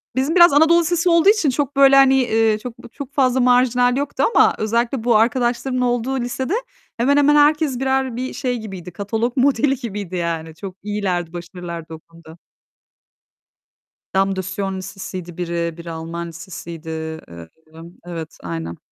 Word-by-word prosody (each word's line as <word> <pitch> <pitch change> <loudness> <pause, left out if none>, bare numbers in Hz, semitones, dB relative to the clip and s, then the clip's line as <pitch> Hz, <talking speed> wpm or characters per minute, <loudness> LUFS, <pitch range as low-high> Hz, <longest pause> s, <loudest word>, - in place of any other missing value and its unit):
Bizim 275 +6 0
biraz 345 -4 +7
Anadolu 320 +4 +5
lisesi 345 +1 +1
olduğu 335 +3 +5
için 410 -10 +3
çok, 280 +1 -2
böyle, 275 0 +6
hani, 245 -5 +4
çok 250 - -6 0.2
çok 280 -1 -8
fazla 260 -2 +2
marjinal 250 0 +3
yoktu 285 0 -2
ama - - +5
özellikle 235 +3 -1
bu 235 -1 +3
arkadaşlarımın 245 +3 +1
olduğu 245 +2 0
lisede, 255 +6 -3 0.4
hemen 275 +5 +2
hemen 290 +1 +4
herkes, 295 -3 +3
birer, 265 -2 0
bir 255 +2 -4
şey 250 -1 -2
gibiydi, 190 -6 -8
katalog 225 +7 -3
modeli 270 +1 +2
gibiydi 205 -7 -6
yani. 165 -2 -3
Çok 185 +2 -8
iyilerdi, 190 -5 -2
başarılılardı 170 -2 -8
o 160 - -8
konuda. 165 0 -17 1.8
Dame 195 0 +2
de 190 - -2
Sion 195 +1 -4
lisesiydi 185 -2 -8
biri, 170 -1 -3 0.2
biri 170 0 -8
Alman 165 +1 -6
lisesiydi, 165 0 -9
eee, 160 - -7 0.2
sanırım, 165 +2 -14
evet, 165 -3 -7
aynen. 85 -1 -5
225 Hz, 150 wpm, -20 LUFS, 170-265 Hz, 1.8 s, biraz